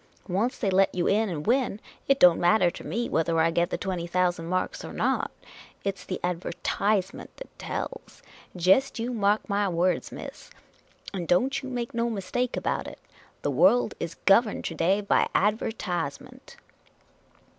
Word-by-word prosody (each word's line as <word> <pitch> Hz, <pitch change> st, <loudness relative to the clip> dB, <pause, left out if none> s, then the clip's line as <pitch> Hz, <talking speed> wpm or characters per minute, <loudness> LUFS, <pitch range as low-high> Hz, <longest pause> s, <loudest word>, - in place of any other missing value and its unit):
Once 210 Hz, +7 st, 0 dB
they 200 Hz, -5 st, 0 dB
let 190 Hz, +1 st, +3 dB
you 175 Hz, -, 0 dB
run 215 Hz, +1 st, +2 dB
and 150 Hz, -4 st, -4 dB
win, 245 Hz, -3 st, +1 dB, 0.3 s
it 275 Hz, 0 st, +3 dB
don't 175 Hz, -2 st, +7 dB
matter 175 Hz, 0 st, +4 dB
to -, -, -10 dB
me 240 Hz, +1 st, -2 dB
whether 165 Hz, 0 st, +1 dB
I 165 Hz, +1 st, +3 dB
get 170 Hz, +1 st, +1 dB
the -, -, -2 dB
twenty 180 Hz, -3 st, -3 dB
thousand 175 Hz, -1 st, 0 dB
marks 185 Hz, +1 st, -2 dB
or -, -, -7 dB
not. -, -, 0 dB, 0.5 s
It 195 Hz, -1 st, -2 dB
's 180 Hz, -, -13 dB
the 185 Hz, -, -4 dB
adver/wrment 190 Hz, +3 st, -1 dB
that -, -, -13 dB
tells. -, -, -6 dB, 0.3 s
Jest 190 Hz, +12 st, +3 dB
you 235 Hz, +2 st, -3 dB
mark 210 Hz, -1 st, +1 dB
my 200 Hz, -1 st, +1 dB
words, 180 Hz, +1 st, 0 dB
miss, -, -, -9 dB, 0.6 s
and 180 Hz, -4 st, -4 dB
don't 255 Hz, +10 st, +2 dB
you 265 Hz, -, -7 dB
make 245 Hz, -2 st, -4 dB
no 235 Hz, 0 st, 0 dB
mistake 225 Hz, +4 st, -2 dB
about -, -, -2 dB
it -, -, -9 dB, 0.3 s
— -, -, -31 dB
the 145 Hz, -, 0 dB
world 190 Hz, -, +4 dB
is 170 Hz, -1 st, -4 dB
gov 205 Hz, +5 st, +6 dB
erned 210 Hz, -, -5 dB
to -, -, -3 dB
day 180 Hz, +6 st, +1 dB
by 200 Hz, -, +2 dB
adver/Z^nnent. 185 Hz, -7 st, -2 dB
195 Hz, 175 wpm, -26 LUFS, 175-225 Hz, 0.6 s, don't